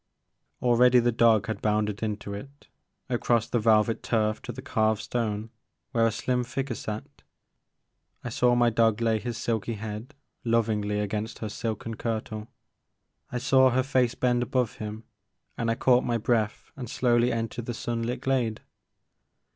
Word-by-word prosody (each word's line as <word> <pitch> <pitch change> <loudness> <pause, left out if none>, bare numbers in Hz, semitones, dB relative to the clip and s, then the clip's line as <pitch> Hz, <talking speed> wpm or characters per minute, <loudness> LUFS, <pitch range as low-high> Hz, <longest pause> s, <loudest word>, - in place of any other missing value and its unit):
Already 125 +1 +5
the 120 0 +4
dog 115 -1 +4
had 110 -1 -4
bounded 105 -1 0
into 105 -2 -3
it, 140 +8 -10 0.4
across 120 -3 +1
the 120 - 0
velvet 110 0 +3
turf 110 -2 0
to - - -6
the 130 +2 -9
carved 110 -4 +1
stone 110 -1 -2 0.4
where 115 -1 +3
a - - +1
slim 125 +3 -1
figure 130 +2 -3
sat. 110 -1 -7 1.0
I 125 - -4
saw 120 +1 +3
my 120 -1 +4
dog 115 -1 +3
lay 115 -2 +2
his 120 +2 -4
silky 115 0 -2
head 110 +6 -7 0.3
lovingly 110 -3 +1
against 105 +2 -3
her 110 - -4
silken 115 +1 -4
kirtle; 110 -1 -3 0.8
I 125 - -2
saw 130 +1 +5
her 130 +1 +2
fece 125 -2 +1
bend 125 -1 +1
above 125 -2 0
him, 110 +1 -6 0.5
and 115 - -1
I 115 - +2
caught 125 +1 +4
my 120 -1 0
breath 110 -2 -1
and 125 -4 -7
slowly 120 0 +2
entered 115 0 -3
the 120 - -3
sun 115 0 -3
lit 120 +2 -3
glade. 125 -5 0
115 Hz, 160 wpm, -27 LUFS, 110-120 Hz, 1.0 s, Already